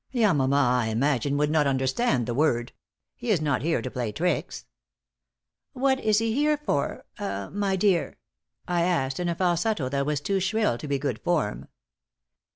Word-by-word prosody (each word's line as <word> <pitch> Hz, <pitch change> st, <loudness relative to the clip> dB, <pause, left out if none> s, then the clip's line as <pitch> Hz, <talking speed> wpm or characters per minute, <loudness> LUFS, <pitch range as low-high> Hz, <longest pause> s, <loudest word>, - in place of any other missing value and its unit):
"Yamama, 150 Hz, -, +3 dB
I 125 Hz, -4 st, +2 dB
imagine, 140 Hz, +4 st, 0 dB
would 150 Hz, +1 st, +1 dB
not 155 Hz, -2 st, +3 dB
understand 130 Hz, -, +1 dB
the 120 Hz, -, -2 dB
word. 120 Hz, -3 st, +1 dB, 0.4 s
He 245 Hz, -, -6 dB
is 200 Hz, -6 st, +3 dB
not 145 Hz, -5 st, 0 dB
here 160 Hz, -5 st, 0 dB
to -, -, -4 dB
play 120 Hz, -4 st, -3 dB
tricks." 175 Hz, -, -2 dB, 1.1 s
"What 265 Hz, 0 st, +1 dB
is 215 Hz, -3 st, +2 dB
he 225 Hz, 0 st, +1 dB
here 295 Hz, +3 st, +2 dB
for 145 Hz, -, -2 dB
ah 100 Hz, 0 st, -4 dB
my 200 Hz, -1 st, 0 dB
dear?" 190 Hz, -3 st, +1 dB, 0.5 s
I 175 Hz, -1 st, +1 dB
asked, 150 Hz, -6 st, 0 dB
in 175 Hz, -1 st, -1 dB
a 170 Hz, -, -1 dB
falsetto 175 Hz, -, 0 dB
that 140 Hz, +1 st, -1 dB
was 150 Hz, -2 st, 0 dB
too 195 Hz, +7 st, -1 dB
shrill 195 Hz, -, 0 dB
to 150 Hz, -, -6 dB
be 140 Hz, -1 st, 0 dB
good 130 Hz, -5 st, -3 dB
form. 155 Hz, -12 st, -1 dB
150 Hz, 170 wpm, -26 LUFS, 130-195 Hz, 1.1 s, Yamama